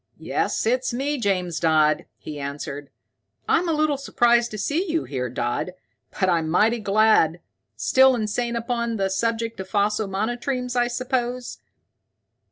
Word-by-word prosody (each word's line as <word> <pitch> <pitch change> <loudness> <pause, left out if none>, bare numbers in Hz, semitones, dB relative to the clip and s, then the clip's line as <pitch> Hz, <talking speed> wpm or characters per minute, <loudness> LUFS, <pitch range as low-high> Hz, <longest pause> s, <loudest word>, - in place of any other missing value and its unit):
"Yes, - - -1
it's 250 +3 +1
me, 275 +4 -2
James 185 -6 -1
Dodd," 155 -2 +3
he 150 -1 -8
answered. 140 0 -6 0.6
"I'm 350 - +2
a - - +2
little 305 -2 +1
surprised 240 -3 +2
to 215 - -7
see 325 - -1
you 325 0 0
here, 125 -3 -3
Dodd, 120 +8 -2 0.5
but 190 - +3
I'm 165 -3 +1
mighty 220 +7 +3
glad. 205 -5 +3 0.4
Still 260 - +4
insane 235 +2 -2
upon 235 -1 -2
the 195 -1 0
subject 230 +2 -1
of 190 0 -6
fossil 210 +1 +1
monotremes, 240 +5 -2
I 240 -1 +3
suppose?" 250 0 -3
225 Hz, 145 wpm, -23 LUFS, 180-245 Hz, 0.6 s, Still